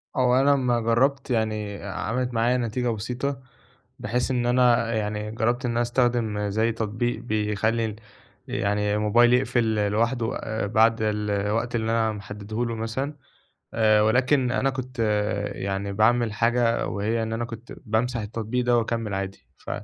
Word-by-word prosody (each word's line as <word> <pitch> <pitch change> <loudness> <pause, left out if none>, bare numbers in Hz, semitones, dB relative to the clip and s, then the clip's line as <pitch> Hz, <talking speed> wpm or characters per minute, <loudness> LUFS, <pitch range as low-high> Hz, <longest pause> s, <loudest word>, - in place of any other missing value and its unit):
هو 125 -2 +3
أنا 140 +1 +4
أمّا 125 -3 +1
جرّبت 130 +5 +1
يعني 110 -3 -1
آآ، 100 - -5
عَمَلِت 125 +5 -2
معايا 120 +2 +2
نتيجة 120 +1 -1
بسيطة، 125 +5 -3 0.6
بحيث 120 +5 -1
إن 125 -2 0
أنا 120 -1 +3
يعني 105 0 -2
جرّبت 120 +3 0
إن 120 - 0
أنا 120 0 +1
أستخدم 120 -4 0
زي 110 +3 +1
تطبيق 115 +1 -2
بيخلّي 110 0 0
ال 110 -2 -4 0.5
يعني 105 +1 0
الموبايل 115 +3 +4
يقفل 125 -1 +2
ل 105 -1 +1
لوحده 115 +2 0
آآ، 110 -1 -3
بعد 115 +2 +4
الوقت 105 +2 -1
اللي 110 -1 0
أنا 115 -1 +2
محدّده 105 +2 -5
له 115 -1 -3
مثلًا 115 +6 -3 0.6
آآ، 110 -1 +4
ولكن 125 +4 +3
أنا 135 +1 +1
كنت 130 -1 -7 0.6
يعني 100 +1 -3
باعمل 110 +2 +2
حاجة 115 +1 +1
وهي 110 +3 -1
إن 110 0 -3
أنا 115 +1 -2
كنت 115 +1 -9
بامسح 115 +2 0
التطبيق 110 +3 -3
ده 120 0 +3
وأكمّل 115 -2 -2
عادي، 95 0 -5
ف - - -10
115 Hz, 155 wpm, -25 LUFS, 105-120 Hz, 0.6 s, أنا